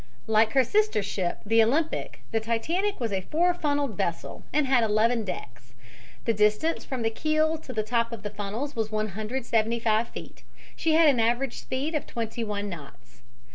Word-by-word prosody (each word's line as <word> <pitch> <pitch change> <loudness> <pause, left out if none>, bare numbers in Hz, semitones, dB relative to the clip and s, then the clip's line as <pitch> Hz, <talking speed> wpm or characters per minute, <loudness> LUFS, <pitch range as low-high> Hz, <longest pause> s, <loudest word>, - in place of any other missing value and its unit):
Like 220 0 +3
her 265 - +5
sister 420 - +2
ship, 190 -3 -2
the 225 +2 +5
Olympic, 300 +8 -1
the 225 - +2
Titanic 320 - -1
was 230 -3 -2
a 190 - 0
four 345 - +2
funneled 285 - -1
vessel, 170 - -3
and 300 0 +2
had 260 -3 +3
eleven 225 +2 +2
decks. 120 - -8 0.5
The 230 - +2
distance 210 +10 +2
from 255 -3 -4
the 225 - +1
keel 310 +5 +1
to 270 - -9
the 220 -3 -1
top 230 +1 0
of 225 -3 -7
the 205 - -4
funnels 210 +8 -4
was 220 -2 -2
175 220 +1 0
feet. - - -10 0.3
She 320 - +1
had 325 0 +6
an 270 -5 +4
average 235 +3 +1
speed 270 +5 -3
of 300 - -2
twenty 230 0 -3
one 205 -1 -3
knots. 140 -9 -11
230 Hz, 175 wpm, -27 LUFS, 215-280 Hz, 0.5 s, had